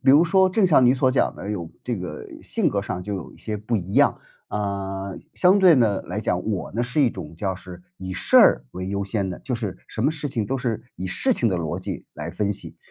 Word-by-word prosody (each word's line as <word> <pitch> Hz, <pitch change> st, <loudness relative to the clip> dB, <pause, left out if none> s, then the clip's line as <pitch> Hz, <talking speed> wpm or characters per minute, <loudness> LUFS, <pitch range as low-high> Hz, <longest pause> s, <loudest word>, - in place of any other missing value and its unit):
比 135 Hz, 0 st, +5 dB
如 150 Hz, -, +7 dB
说 190 Hz, +2 st, +4 dB
正 195 Hz, +2 st, +2 dB
像 150 Hz, -8 st, +5 dB
你 125 Hz, -, +5 dB
所 130 Hz, -1 st, +3 dB
讲 130 Hz, -, +1 dB
的 100 Hz, -, -6 dB
有 85 Hz, -6 st, -4 dB
这 120 Hz, -3 st, -2 dB
个 90 Hz, -5 st, -6 dB, 0.2 s
性 -, -, 0 dB
格 -, -, 0 dB
上 90 Hz, -, -4 dB
就 100 Hz, +1 st, -3 dB
有 90 Hz, -, -8 dB
一 -, -, -18 dB
些 105 Hz, -1 st, -4 dB
不 110 Hz, +3 st, -1 dB
一 95 Hz, 0 st, -4 dB
样， -, -, +5 dB, 0.3 s
啊， 100 Hz, -1 st, -3 dB, 0.2 s
相 190 Hz, +2 st, +5 dB
对 180 Hz, -4 st, +7 dB
地 110 Hz, -6 st, +3 dB
来 105 Hz, +4 st, -4 dB
讲， 90 Hz, -4 st, 0 dB
我 100 Hz, -4 st, -2 dB
呢 120 Hz, +4 st, 0 dB
是 125 Hz, +5 st, 0 dB
一 125 Hz, -, +4 dB
种 85 Hz, -6 st, -8 dB
叫 95 Hz, +3 st, -2 dB
是 90 Hz, -1 st, -10 dB
以 95 Hz, 0 st, -6 dB
事 90 Hz, -, +2 dB
儿 -, -, +7 dB
为 90 Hz, +1 st, -5 dB
优 100 Hz, 0 st, -1 dB
先 100 Hz, -1 st, -1 dB
的， 90 Hz, -, -6 dB
就 125 Hz, -3 st, -3 dB
是 105 Hz, -6 st, -4 dB
什 -, -, -5 dB
么 -, -, +5 dB
事 150 Hz, -2 st, -4 dB
情 115 Hz, -5 st, -2 dB
都 135 Hz, -, -1 dB
是 115 Hz, -4 st, -2 dB
以 95 Hz, -, -6 dB
事 250 Hz, -, +1 dB
情 120 Hz, -, +1 dB
的 95 Hz, -, 0 dB
逻 80 Hz, -3 st, -3 dB
辑 -, -, -6 dB
来 75 Hz, +3 st, -5 dB
分 100 Hz, +3 st, -1 dB
析。 100 Hz, -, -8 dB
105 Hz, 275 characters per minute, -24 LUFS, 95-130 Hz, 0.3 s, 如